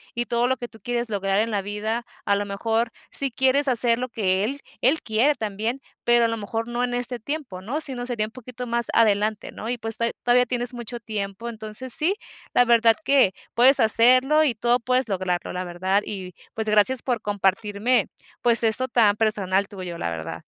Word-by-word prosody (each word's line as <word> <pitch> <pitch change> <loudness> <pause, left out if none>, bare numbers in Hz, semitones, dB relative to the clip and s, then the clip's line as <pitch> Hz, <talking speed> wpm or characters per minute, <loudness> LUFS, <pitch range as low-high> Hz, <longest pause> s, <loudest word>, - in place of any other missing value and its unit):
y 240 0 -1
todo 240 0 0
lo 260 +1 0
que 240 -1 -6
tú 225 - -18
quieres 240 -1 -2
lograr 195 -1 0
en 225 +1 0
la 205 -2 -1
vida. 215 +4 -3 0.2
A 200 - +2
lo 205 +1 -2
mejor, 225 +4 -1 0.2
si 275 - +3
quieres 265 +3 +1
hacer 235 -2 +3
lo 255 - -4
que 195 -4 0
él, 270 +7 -3 0.2
él 290 +6 +2
quiere 240 +7 +2
también, 220 +4 -4 0.2
pero 240 0 +4
a - - +3
lo 230 - -2
mejor, 225 +2 -4
no 240 +1 -2
en 245 0 -1
este 245 0 -1
tiempo, 255 -8 -6
¿no?, 250 +10 -3
sino, 260 -6 -3
sería 235 -4 -1
un 215 - -11
poquito 250 0 -9
más 235 -1 +1
adelante, 215 -1 +1
¿no? 220 - -7
Y, 245 - -2
pues, 225 -1 -5
to 230 - 0 0.2
todavía 245 +1 +4
tienes 245 0 -3
mucho 240 0 -7
tiempo. 210 -1 -5
Entonces, 220 +3 -2
sí, 350 +6 +3 0.4
la 245 - +5
verdad 230 -1 +4
que 270 -9 +4 0.2
puedes 260 +4 +5
hacerlo 255 +7 +6
y 270 -6 0
todo 240 +3 +1
puedes 255 +1 0
lograrlo, 185 -2 -2
la 180 0 -3
verdad. 185 +3 -1
Y, 185 -3 -7 0.2
pues, 220 -1 -3
gracias 215 +4 +3
por 245 -4 -2
compartirme, 205 +3 0 0.3
pues, 235 -1 +7
esto 230 +3 +2
tan 225 -5 +3
personal 200 -3 0
tuyo, 185 -4 -7
la - - -2
verdad. 80 0 -6
230 Hz, 205 wpm, -23 LUFS, 205-245 Hz, 0.4 s, pues